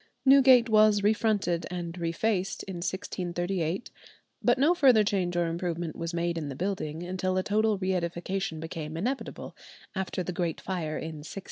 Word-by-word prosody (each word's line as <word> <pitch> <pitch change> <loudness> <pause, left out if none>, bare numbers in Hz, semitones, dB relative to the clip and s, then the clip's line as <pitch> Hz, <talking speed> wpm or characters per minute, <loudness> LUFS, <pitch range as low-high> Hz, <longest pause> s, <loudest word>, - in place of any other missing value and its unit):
Newgate 265 -3 +7
was 215 -2 +5
refronted 205 -5 +1
and 175 -1 -4
refaced 180 +3 -1
in 190 -2 -6
1638, 175 0 -3 0.5
but 240 +3 +3
no 295 +7 +4
further 260 -10 +5
change 185 -4 0
or 175 - +2
improvement 170 -1 -3
was 165 0 -4
made 170 -1 -1
in 150 -3 -4
the 135 - -5
building 170 -2 -3
until 185 +1 -1
a 185 - +1
total 215 +1 +2
reëdification 185 -1 -2
became 160 -1 -6
inevitable, 250 +10 -4 0.4
after 190 -1 -2
the 180 - -4
great 170 -1 -2
fire 165 -5 -3
in 160 -1 -5
1666. 155 - -9
180 Hz, 155 wpm, -28 LUFS, 170-205 Hz, 0.5 s, Newgate